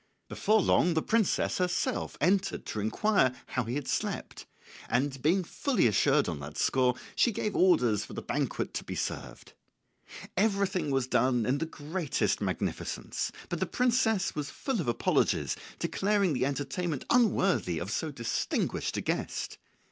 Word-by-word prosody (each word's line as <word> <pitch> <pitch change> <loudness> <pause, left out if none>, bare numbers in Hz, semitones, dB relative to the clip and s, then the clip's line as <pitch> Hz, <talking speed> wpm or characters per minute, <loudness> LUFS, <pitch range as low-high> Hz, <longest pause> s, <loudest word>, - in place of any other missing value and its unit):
Before 215 +1 +2
long 175 -1 +3
the 160 - +1
princess 225 -5 +1
herself 180 -1 -1
entered 190 +5 +1
to 110 - -4
inquire 130 - +2
how 130 -3 -2
he 120 +3 -3
had 145 -2 -3
slept, - - -3 0.4
and 135 +2 0
being 175 +7 +3
fully 265 - 0
assured 110 -4 +3
on - - -3
that 75 +1 -8
score, 125 -2 +2 0.2
she 240 - +4
gave 215 -1 -2
orders 125 - +4
for - - -10
the - - -5
banquet - - -2
to - - -3
be - - -6
served. - - -5 0.8
Everything 195 -5 +1
was 135 -2 +1
done 125 -1 +2
in 135 +4 +1
the 165 - -2
greatest 155 0 -1
magnificence, - - -3 0.2
but 175 - -3
the 190 - 0
princess 230 -2 +2
was 150 -2 -3
full 260 -8 -2
of 155 - -5
apologies, 120 - +1 0.2
declaring 200 -3 +1
the 130 0 +1
entertainment 145 +2 -3
unworthy 195 - +3
of 85 +6 -4
so 155 +8 -1
distinguished 115 -5 -2
a - - -1
guest. - - -3
160 Hz, 155 wpm, -29 LUFS, 125-195 Hz, 0.8 s, she